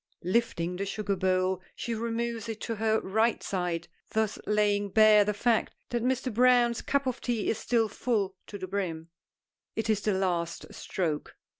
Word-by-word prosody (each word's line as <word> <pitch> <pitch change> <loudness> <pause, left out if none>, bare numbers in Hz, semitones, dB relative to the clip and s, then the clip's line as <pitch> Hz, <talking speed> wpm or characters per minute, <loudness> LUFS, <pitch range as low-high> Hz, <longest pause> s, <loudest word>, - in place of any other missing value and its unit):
Lifting 180 -3 0
the 200 - -2
sugar 205 0 -1
bowl 185 0 +1
she 235 - -3
removes 230 0 -2
it 220 -1 -4
to 230 -2 -3
her 220 +1 +2
right 220 +4 +1
side, 175 -3 -2 0.2
thus 220 -1 0
laying 205 -1 +2
bare 215 0 +7
the 210 - 0
fact 225 +2 +1 0.2
that 240 -1 0
Mr. 255 -1 0
Browne's 245 0 +4
cup 280 -1 0
of 255 -2 -2
tea 235 -4 0
is 225 - -3
still 230 -2 +2
full 205 -3 -1
to 205 - -7
the 185 -1 -6
brim. 170 -4 -3 0.7
It 225 0 0
is 210 -1 0
the 210 -2 +1
last 175 -3 -2
stroke. 160 -5 -3
210 Hz, 170 wpm, -29 LUFS, 190-230 Hz, 0.7 s, bare